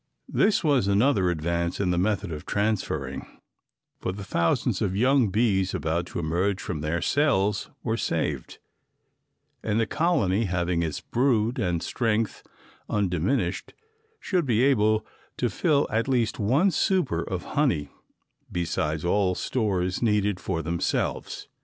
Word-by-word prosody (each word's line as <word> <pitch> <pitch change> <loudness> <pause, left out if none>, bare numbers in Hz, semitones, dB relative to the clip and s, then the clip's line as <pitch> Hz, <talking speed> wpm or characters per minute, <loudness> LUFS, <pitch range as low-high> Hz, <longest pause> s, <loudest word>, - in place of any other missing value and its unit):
This 210 - +3
was 140 -10 +3
another 100 -2 +3
advance 85 +1 -1
in 95 -3 +1
the 90 - 0
method 100 -1 0
of 75 -1 -6
transferring, 95 -10 -2 0.7
for - - -2
the 100 +2 -7
thousands 85 -4 0
of 95 - 0
young 125 +1 +3
bees 95 -3 +1
about 80 +3 -1
to - - -7
emerge 85 +4 0
from 75 - -4
their 80 +3 -1
cells 105 -9 +1
were - - -1
saved, - - -2 1.0
and 110 0 0
the 115 - +2
colony 115 - +1
having 90 -2 0
its 80 -3 -2
brood 120 -2 +1
and 90 -6 0
strength 115 -3 -1 0.5
undiminished 95 - -1 0.4
should 180 -7 0
be 120 0 +3
able 110 -5 +3 0.3
to 120 -3 0
fill 145 - +2
at 115 +3 0
least 125 -4 0
one 135 - +3
super 175 - +1
of 90 0 -4
honey 130 - +1 0.6
besides 80 -2 -2
all 90 0 +2
stores 95 -7 -1
needed 105 -4 +1
for 80 - -3
themselves. 85 +2 -2
100 Hz, 135 wpm, -26 LUFS, 85-120 Hz, 1.0 s, This